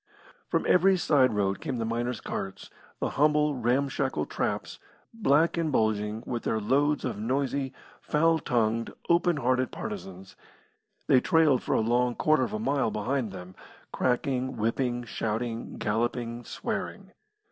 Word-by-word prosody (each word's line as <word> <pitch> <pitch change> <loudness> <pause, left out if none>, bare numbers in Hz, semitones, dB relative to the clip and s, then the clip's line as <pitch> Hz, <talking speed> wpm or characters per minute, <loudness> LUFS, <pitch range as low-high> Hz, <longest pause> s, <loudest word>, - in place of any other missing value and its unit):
From - - 0
every 190 +2 +5
side 130 -9 +3
road 100 -1 0
came 130 - -3
the 115 - -2
miners' 120 +2 -2
carts, 95 0 -6 0.3
the - - -1
humble, 150 0 +3
ramshackle 130 - 0
traps, - - -3 0.3
black 165 -7 +2
and 165 -2 0
bulging, 110 -2 0
with 120 -1 -3
their 110 - -1
loads 145 +7 +1
of - - -3
noisy, 135 +3 -1 0.3
foul 165 +2 +2
tongued, 115 -3 0 0.2
open 170 -1 +3
hearted 130 -1 +1
partisans. 95 - -7 0.7
They 130 - +5
trailed 155 -5 +3
for - - -1
a - - +3
long 120 +2 +1
quarter 155 -3 +3
of 125 - -1
a - - -1
mile 135 +2 +1
behind 115 +2 -2
them 90 -1 -9 0.4
cracking, 130 +1 0
whipping, 120 +2 0
shouting, 115 +1 -3
galloping, 120 +2 -2
swearing. - - -5
125 Hz, 140 wpm, -28 LUFS, 110-140 Hz, 0.7 s, every